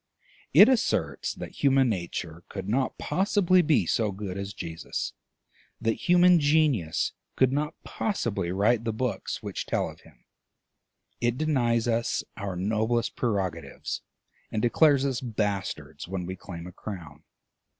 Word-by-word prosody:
It - - +9
asserts 260 -3 +1
that - - -8
human 135 -2 +5
nature 85 -4 -3
could 95 -1 -6
not 130 +5 0
possibly 185 -1 +3
be 150 - +3
so 110 +3 +1
good 95 -1 -5
as 100 0 -4
Jesus, 80 -5 -5 0.7
that 115 +8 -2
human 180 0 +7
genius 145 - +2 0.2
could 130 -1 +4
not 150 +3 -1
possibly 100 - -2
write 105 +5 +2
the 115 -1 -1
books 110 -3 -3
which - - -4
tell - - 0
of - - -11
him; - - -21 0.9
it 120 0 +1
denies 120 -7 +1
us 115 0 0
our 100 -3 -4
noblest 110 +5 0
prerogatives, 95 -8 -2 0.5
and 105 - -1
declares 140 +3 +4
us 135 -3 -1
bastards 100 - -3
when 90 -1 -3
we 95 +1 -4
claim 85 -2 -8
a 90 - -8
crown. 80 -7 -8
110 Hz, 140 wpm, -27 LUFS, 95-135 Hz, 0.9 s, It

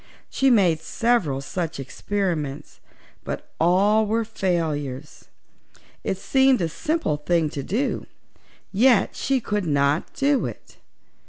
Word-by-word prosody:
She 270 - +3
made 180 -9 +3
several 165 - 0
such 165 +2 -4
experiments, 155 -1 -3 0.4
but - - -6
all 200 +6 +3
were 225 +2 0
failures. 155 - -3 0.8
It 190 - -2
seemed 265 +5 +3
a 170 -3 0
simple 305 - -1
thing 155 0 0
to 140 - -4
do, 230 - -2 0.6
yet 235 +3 +3
she 270 -1 0
could 210 -5 -2
not 145 +1 +1
do 280 0 +2
it. - - -11
185 Hz, 115 wpm, -23 LUFS, 150-230 Hz, 0.8 s, She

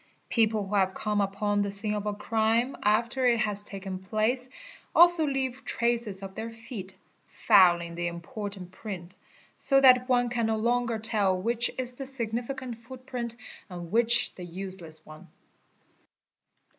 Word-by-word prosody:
People 220 -3 +2
who 195 - -7
» 200 - +5
have 190 0 -1
come 210 -1 0
upon 205 +1 0
the 200 - -1
scene 205 +2 -1
of 210 0 -3
a 210 - 0
crime 225 +4 +1
after 235 +5 +1
it 235 -1 +3
has 210 -3 0
taken 195 -2 -7
place 220 +6 -1 0.5
also 345 -2 +6
leave 265 -2 -2
traces 235 -5 -1
of 195 0 -7
their 225 +3 -5
feet, 225 -4 -8 0.3
fouling 175 -3 +4
the 175 +1 -2
important 180 +2 -6
print, 185 -2 -8 0.4
so 275 -1 +3
that 255 -1 +6
one 245 -1 +3
can 235 -2 0
no 220 0 0
longer 235 +1 0
tell 210 -4 +1
which 235 +4 +2
is 250 -1 -2
the 270 +1 -5
significant 245 0 -3
footprint 245 -1 -6 0.3
and 175 -2 -8
which 235 +1 +3
the 180 - -9
useless 175 -3 -6
one. 155 +4 -13
220 Hz, 155 wpm, -28 LUFS, 195-240 Hz, 0.5 s, also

